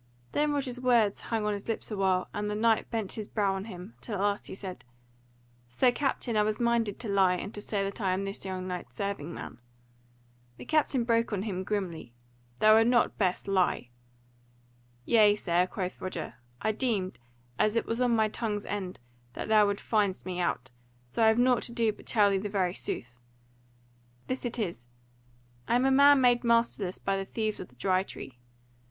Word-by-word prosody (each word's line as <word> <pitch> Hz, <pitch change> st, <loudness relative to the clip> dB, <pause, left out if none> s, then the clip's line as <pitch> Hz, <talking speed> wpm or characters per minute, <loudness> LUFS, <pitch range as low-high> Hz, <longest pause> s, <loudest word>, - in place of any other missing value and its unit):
Then 295 Hz, 0 st, +1 dB
Roger's 265 Hz, -4 st, -2 dB
words 235 Hz, -5 st, +3 dB
hung 225 Hz, -2 st, -2 dB
on 210 Hz, -, +1 dB
his 200 Hz, -1 st, -6 dB
lips 225 Hz, 0 st, -3 dB
awhile, 190 Hz, -3 st, +1 dB
and 210 Hz, 0 st, -2 dB
the 210 Hz, -, -2 dB
knight 225 Hz, +1 st, +2 dB
bent 220 Hz, -4 st, -3 dB
his 215 Hz, -2 st, -5 dB
brow 200 Hz, -3 st, 0 dB
on 195 Hz, +1 st, -4 dB
him, 185 Hz, 0 st, -9 dB
till 220 Hz, -, -5 dB
at 195 Hz, -, -2 dB
last 205 Hz, 0 st, 0 dB
he -, -, -7 dB
said, 190 Hz, -2 st, -7 dB, 0.9 s
"Sir 245 Hz, -, +3 dB
Captain, 255 Hz, -3 st, -1 dB
I 210 Hz, -, +4 dB
was 210 Hz, 0 st, 0 dB
minded 235 Hz, -4 st, +1 dB
to 230 Hz, -, -5 dB
lie, 190 Hz, -2 st, +3 dB
and 195 Hz, +3 st, -6 dB
say 205 Hz, -2 st, -1 dB
that 195 Hz, +3 st, -4 dB
I 190 Hz, -2 st, +1 dB
am 195 Hz, +2 st, -2 dB
this 195 Hz, 0 st, -4 dB
young 185 Hz, -1 st, -4 dB
knight's 175 Hz, -9 st, -6 dB
serving 195 Hz, -3 st, -3 dB
man." 120 Hz, -, -8 dB, 1.0 s
The -, -, -10 dB
captain 295 Hz, -5 st, +2 dB
broke 230 Hz, 0 st, +1 dB
in 200 Hz, -3 st, -1 dB
on -, -, -3 dB
him 190 Hz, -4 st, -3 dB
grimly, 175 Hz, -, -4 dB, 0.4 s
"Thou 215 Hz, +8 st, +6 dB
wert 240 Hz, +1 st, +3 dB
best 185 Hz, -3 st, 0 dB
not 195 Hz, -, -1 dB
lie." 180 Hz, -9 st, +1 dB, 1.2 s
"Yea, 210 Hz, -3 st, +5 dB
sir," 180 Hz, -3 st, +1 dB
quoth 185 Hz, -1 st, -5 dB
Roger, 185 Hz, -3 st, -5 dB, 0.3 s
"I 220 Hz, -, +1 dB
deemed, 210 Hz, -5 st, -1 dB, 0.4 s
as 215 Hz, +1 st, +2 dB
it 230 Hz, -, +1 dB
was 230 Hz, +2 st, -2 dB
on 245 Hz, -2 st, +3 dB
my 220 Hz, -1 st, +3 dB
tongue's 210 Hz, -1 st, -3 dB
end, 190 Hz, -3 st, -4 dB, 0.3 s
that -, -, -5 dB
thou 215 Hz, -1 st, +6 dB
wouldst 200 Hz, 0 st, -3 dB
find 205 Hz, -4 st, +1 dB
me 180 Hz, -1 st, -4 dB
out, 130 Hz, -7 st, -1 dB, 0.3 s
so 120 Hz, -, -1 dB
I -, -, +6 dB
have 220 Hz, +1 st, +4 dB
nought 250 Hz, 0 st, +4 dB
to -, -, -6 dB
do 230 Hz, -2 st, +1 dB
but -, -, -17 dB
tell 205 Hz, -3 st, +4 dB
thee 195 Hz, -, +1 dB
the 205 Hz, +2 st, -4 dB
very 185 Hz, -3 st, 0 dB
sooth: 125 Hz, -8 st, -5 dB, 1.1 s
this 255 Hz, 0 st, -3 dB
it 240 Hz, 0 st, -3 dB
is: 170 Hz, -, -4 dB, 0.8 s
I -, -, +2 dB
am 250 Hz, +2 st, +3 dB
a 270 Hz, -, +4 dB
man 280 Hz, +1 st, +7 dB
made 245 Hz, -1 st, +4 dB
masterless 230 Hz, -5 st, +1 dB
by 195 Hz, 0 st, -1 dB
the 195 Hz, -, -2 dB
thieves 215 Hz, +1 st, -3 dB
of 180 Hz, -, -7 dB
the 125 Hz, -, -23 dB
Dry 185 Hz, +8 st, +1 dB
Tree. 130 Hz, -9 st, -9 dB
205 Hz, 200 wpm, -29 LUFS, 185-230 Hz, 1.2 s, man